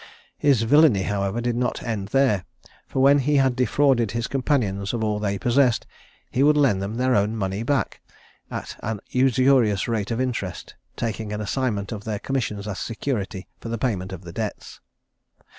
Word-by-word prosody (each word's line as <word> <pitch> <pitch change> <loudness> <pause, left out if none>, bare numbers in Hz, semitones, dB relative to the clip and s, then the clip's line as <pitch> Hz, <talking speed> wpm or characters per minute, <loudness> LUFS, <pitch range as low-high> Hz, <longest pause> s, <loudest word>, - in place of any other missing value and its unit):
His 135 -6 +3
villany, 135 -5 +5
however, 100 +3 -1
did 120 0 -1
not 125 +1 -1
end 110 -5 -3
there, 115 -6 +2 0.4
for 130 - 0
when 140 +1 +6
he 145 +2 +1
had 135 -2 +3
defrauded 125 -2 +2
his 115 0 -1
companions 120 -8 0
of 115 -2 -1
all 105 -1 0
they 100 -1 -1
possessed, 120 +3 +2 0.5
he 130 - 0
would 150 +1 +5
lend 125 -10 +3
them 100 +3 -4
their 130 +1 +1
own 105 +1 +1
money 95 -1 -2
back, 140 +3 -1 0.5
at - - -6
a 110 0 -3
usurious 130 -5 +3
rate 110 -4 -1
of 115 - -2
interest, 115 -8 -3 0.2
taking 110 -2 -3
an 105 - -3
assignment 105 -2 -2
of 105 -2 -5
their 110 -1 -3
commissions 105 -4 -3
as 100 -2 -4
security 105 -5 -3
for 115 - -7
the 115 - -2
payment 100 -6 -2
of 95 -1 -8
the 85 -1 -9
debts. - - -5
115 Hz, 175 wpm, -24 LUFS, 100-130 Hz, 0.5 s, when